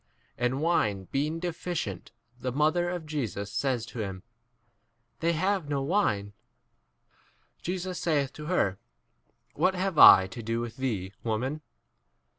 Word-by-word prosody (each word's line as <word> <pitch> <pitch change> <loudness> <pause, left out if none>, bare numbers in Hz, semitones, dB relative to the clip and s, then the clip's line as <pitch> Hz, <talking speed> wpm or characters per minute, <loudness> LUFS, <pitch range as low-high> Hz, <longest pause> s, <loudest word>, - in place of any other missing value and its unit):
And 125 +3 -1
wine 105 - +1
being 150 +4 0
deficient, 165 - -4 0.3
the 125 0 -2
mother 155 +6 +2
of 175 -2 -4
Jesus 110 - -3
says 130 -5 0
to 120 - -9
him, 95 -3 -4 1.0
They 170 +1 +1
have 185 -1 0
no 140 -2 0
4 - - -3
wine. 105 - +1 1.3
Jesus 180 0 -3
saith 145 -6 0
to 150 0 -8
her, 100 - +1 0.7
What 190 - +2
have 185 -3 -1
I 95 - +10
to 95 +5 -8
do 115 +1 -2
with 120 -1 -5
thee, 105 -8 -2
woman? 125 +7 -2
140 Hz, 135 wpm, -28 LUFS, 110-170 Hz, 1.3 s, I